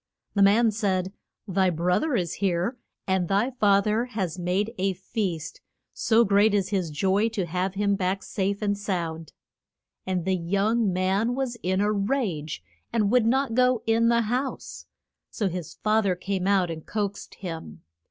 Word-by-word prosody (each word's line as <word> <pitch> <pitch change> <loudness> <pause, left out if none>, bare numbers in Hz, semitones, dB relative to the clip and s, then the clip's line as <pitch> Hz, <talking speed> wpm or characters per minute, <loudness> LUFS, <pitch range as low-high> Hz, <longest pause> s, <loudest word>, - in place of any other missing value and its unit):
The 200 - +1
man 215 +3 +5
said, 190 -3 -1 0.3
Thy 190 -1 +2
broth 175 +1 +1
er 300 -5 0
is 175 -6 -1
here, 190 +4 0 0.3
and 190 -2 +1
thy 200 +7 +1
fa 205 -5 +3
ther 215 +3 +1
has 190 -8 -3
made 190 +6 -1
a 195 +1 +1
feast, 180 -5 -4 0.3
so 230 +1 +3
great 205 +1 +4
is 195 -2 0
his 190 -5 -1
joy 195 +8 +1
to 210 -5 -2
have 180 +3 -2
him 200 0 +1
back 190 0 -1
safe 200 +1 -2
and 205 -1 +1
sound. 170 -6 -4 0.8
And 180 -2 -1
the 190 0 +2
young 200 +5 +1
man 190 +6 +1
was 260 -2 -2
in 185 +2 0
a 210 +1 +2
rage, 200 - -2 0.3
and 215 -3 +1
would 245 -2 +4
not 265 0 +1
go 250 -1 +3
in 230 +1 +3
the 235 0 +3
house; 250 +5 -3 0.4
so 205 - -1
his 180 -3 -5
fa 215 +1 +3
ther 195 -4 +1
came 190 +1 -2
out 190 -4 +2
and 160 -1 -7
coaxed 205 -2 -4
him. 160 - -7
200 Hz, 170 wpm, -26 LUFS, 180-220 Hz, 0.8 s, man